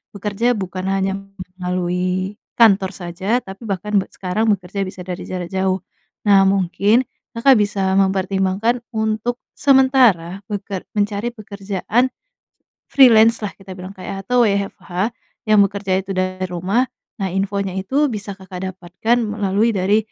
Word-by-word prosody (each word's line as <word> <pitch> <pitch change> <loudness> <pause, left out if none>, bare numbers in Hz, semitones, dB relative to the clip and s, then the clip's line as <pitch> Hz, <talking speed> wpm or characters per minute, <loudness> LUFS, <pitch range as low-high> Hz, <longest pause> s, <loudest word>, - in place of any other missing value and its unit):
Bekerja 210 +4 0
bukan 190 -1 -4
hanya 195 0 0 0.4
melalui 180 +2 -1 0.2
kantor 200 -4 +5
saja, 190 +7 -1
tapi 195 +4 -10
bahkan 205 +2 -2
be - - -4
sekarang 195 +4 -1
bekerja 195 +1 -4
bisa 185 -1 -8
dari 180 0 -5
jarak 180 -2 -4
jauh. 190 0 0 0.5
Nah, 195 -1 +7
mungkin 200 +5 +2 0.3
Kakak 270 +3 +6
bisa 195 -2 0
mempertimbangkan 195 +4 +1
untuk 220 +2 -1 0.2
sementara 255 - +4
beker 200 -2 -4
mencari 205 +3 0
pekerjaan 210 +3 -1 0.8
freelance 230 -4 +6
lah 200 - -2
kita 190 -1 -11
bilang 185 +1 -8
kayak 195 +1 -6
atau 245 -2 +4
WFH 195 0 -1 0.4
yang 215 - +6
bekerja 195 -1 -1
itu 195 0 -5
dari 185 0 -1
rumah. 185 +8 0 0.3
Nah 195 - -1
infonya 195 -1 -1
itu 265 +11 +1
bisa 210 -5 -5
Kakak 190 -1 -8
dapatkan 190 +6 -1
melalui 210 +1 0
dari, 195 +3 +3
195 Hz, 135 wpm, -20 LUFS, 185-220 Hz, 0.8 s, Nah